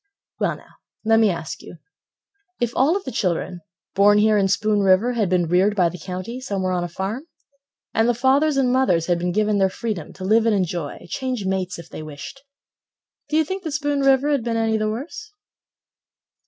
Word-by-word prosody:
Well - - 0
now, - - -19 0.3
let 225 0 +4
me 220 -2 +4
ask 165 -3 -4
you: - - -12 0.8
If 240 -1 -1
all 305 +8 +3
of 400 - -7
the 260 - -5
children, 180 -3 -2 0.3
born 205 +1 +5
here 215 +1 +4
in 200 -2 +3
Spoon 210 +2 +1
River 195 +5 +3
Had 215 -6 0
been 180 -1 +2
reared 185 +5 +2
by 180 -4 +3
the 180 +1 -9
County, 185 +9 -6
somewhere 195 -7 -2
on 180 -1 0
a - - -2
farm; 195 - -5 0.7
And 225 +2 +2
the 240 - +2
fathers 275 +4 +2
and 255 -2 +2
mothers 185 -11 +2
had 175 -1 +1
been 180 +1 -1
given 210 +1 +1
their 190 0 +3
freedom 205 -6 -4
To 190 - -9
live 220 +4 +3
and 220 - +3
enjoy, 175 -5 -3
change 255 0 -3
mates 190 -1 -2
if 170 -1 -10
they 155 - -8
wished, 155 - -9 0.9
Do 310 - +1
you 315 - +3
think 380 +5 -4
that 320 -5 -5
Spoon 290 0 0
River 275 +1 +3
Had 280 -5 +1
been 230 -1 -1
any 225 -1 +1
the 215 0 0
worse? 335 - -6
215 Hz, 205 wpm, -22 LUFS, 185-255 Hz, 0.9 s, born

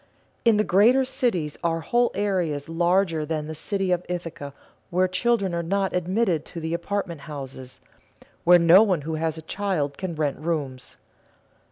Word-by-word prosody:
In 230 -3 +4
the 210 - +3
greater 235 +8 +4
cities 190 - -1
are 165 -1 0
whole 240 +6 +2
areas 175 -8 -1
larger 170 0 +1
than 155 0 -3
the 160 - -6
city 190 +4 -2
of 180 0 +1
Ithaca 165 -5 -5 0.4
where 185 +2 +2
children 195 0 0
are 170 - -1
not 195 +3 -1
admitted 180 -2 0
to 170 - -8
the 160 0 -3
apartment 175 -3 -3
houses, 135 -4 -8 0.6
where 175 +1 +7
no 170 +3 +7
one 190 -8 +2
who 160 +3 -4
has 160 0 -2
a 160 - -8
child 160 -7 -2
can 185 -3 -4
rent 150 -3 -1
rooms. 145 -6 -4
170 Hz, 165 wpm, -24 LUFS, 155-195 Hz, 0.6 s, where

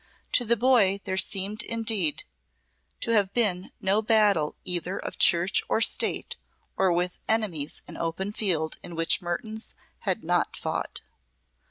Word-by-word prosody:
To 245 - +2
the 235 +1 +2
boy 220 -5 +3
there 190 -2 -3
seemed 200 +2 0
indeed 220 -9 0 0.8
to 230 - -1
have 205 -4 +2
been 195 -6 +2
no 195 +3 +1
battle 210 -8 +2
either 180 +1 -2
of - - -7
Church 175 +3 +4
or - - +2
State, 225 - +1 0.4
or 190 -1 +2
with 175 +1 -1
enemies 185 -10 -1
in - - -7
open 185 +5 -3
field 165 -8 0
in 170 - -8
which 165 +4 +2
Mertouns 215 +6 -5 0.2
had - - -2
not - - 0
fought. - - -4
195 Hz, 145 wpm, -26 LUFS, 175-220 Hz, 0.8 s, Church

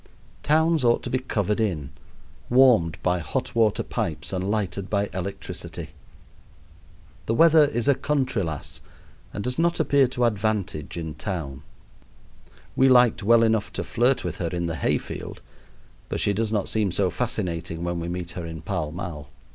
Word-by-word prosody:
Towns 160 0 +2
ought 120 -1 +3
to - - -5
be 130 - +1
covered 105 -5 -1
in, 80 -10 -1 0.6
warmed 120 - +5
by 90 0 +1
hot 75 -4 -3
water 110 -3 +2
pipes, 75 +2 -3
and 95 +1 -2
lighted 100 -2 -2
by 100 -1 0
electricity. 90 -3 -5 1.4
The 115 - +1
weather 160 +1 +6
is 120 -4 -2
a 140 - +6
country 130 -6 0
lass 80 -5 -5 0.5
and 100 - -5
does 125 +4 -3
not 170 +1 +2
appear 140 -4 +4
to 125 0 0
advantage 100 -8 -1
in 80 -2 -4
town. 75 -4 -5 1.1
We 130 0 +5
liked 125 -3 +5
well 115 +3 +5
enough 110 -2 +1
to - - -3
flirt 125 +2 +1
with - - -4
her 85 - -1
in 85 0 -2
the 85 -1 -2
hay - - +1
field, - - -7 0.7
but - - -2
she 100 - +2
does 110 +1 -1
not 105 -3 0
seem 105 -4 0
so 95 0 +1
fascinating 85 -6 -3
when 85 0 -2
we 85 - -4
meet 90 0 -4
her 90 - -6
in 80 -1 -8
Pall 85 -7 -2
Mall. 85 -4 -6
100 Hz, 170 wpm, -25 LUFS, 85-120 Hz, 1.4 s, weather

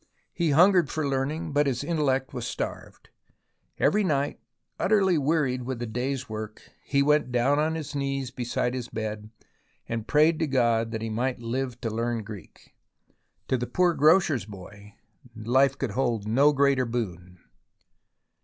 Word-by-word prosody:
He 170 -2 0
hungered 175 +1 +5
for 155 -2 -2
learning, 145 +4 -2
but 145 0 +2
his 125 -3 -1
intellect 135 -6 0
was 125 -2 -4
starved. - - -6 0.7
Every 210 +1 +2
night, 145 -5 0 0.4
utterly 190 -3 +3
wearied 145 -4 +1
with 130 +1 -4
the 120 - -4
day's 125 +3 -3
work, 110 0 -6 0.2
he 140 0 +1
went 150 -3 +2
down 130 +4 +2
on 160 +1 0
his 155 -2 -5
knees 135 -2 -2
beside 120 0 -2
his 125 -2 -5
bed, 110 -1 -5 0.6
and 115 -1 -4
prayed 155 +2 +3
to 160 - 0
God 120 -4 +2
that 110 -1 -4
he 115 - -3
might 125 +4 -1
live 125 +1 -3
to 115 -3 -2
learn 115 0 -2
Greek. 105 -4 -12 0.7
To 130 - +1
the 120 - -3
poor 180 -1 +2
grocer's 155 - +3
boy, 100 +1 -12 0.4
life 130 +5 +2
could - - -2
hold 120 -5 -1
no 135 +7 +4
greater 140 -3 +2
boon. 90 -7 -5
130 Hz, 155 wpm, -26 LUFS, 115-150 Hz, 0.7 s, hungered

